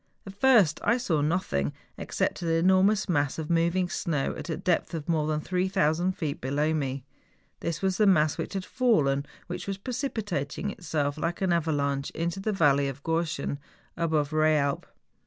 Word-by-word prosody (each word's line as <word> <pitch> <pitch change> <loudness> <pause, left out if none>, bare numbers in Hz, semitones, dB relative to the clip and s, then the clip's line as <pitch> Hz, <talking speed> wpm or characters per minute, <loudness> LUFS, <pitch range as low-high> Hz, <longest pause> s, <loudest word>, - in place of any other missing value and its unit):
At 195 - -8
first 205 - +4
I 235 - +3
saw 170 -12 0
nothing 145 - 0 0.2
except - - -2
an 170 - -3 0.2
enor¬ 190 0 +5
mous 210 +1 +2
mass 145 -6 0
of 160 0 -4
moving 170 +2 +2
snow 155 -5 -1
at - - -7
a 160 - -2
depth 175 -1 0
of 155 -2 -5
more 155 -3 +1
than 155 -1 0
3000 180 -1 +1
feet 155 -5 -4
below 145 +4 0
me. 135 -3 -2 0.6
This 170 +2 -3
was 190 -1 +1
the 215 - +4
mass 155 -5 +4
which - - -5
had 190 -1 -3
fallen 145 - +1 0.2
which 180 +2 -6
was 195 -1 -2
precipitating 205 - -3
itself 150 -5 -2
like 165 +2 -2
an 190 -2 +2
ava¬ 165 -3 +1
lanche 140 -1 -1
into 170 +3 -2
the 215 +3 -1
Valley 145 -7 +3
of 135 +1 -6
Gorschen, 165 -4 -1 0.4
above 160 -3 0
Eealp. 155 -2 +2
165 Hz, 175 wpm, -27 LUFS, 145-185 Hz, 0.6 s, enor¬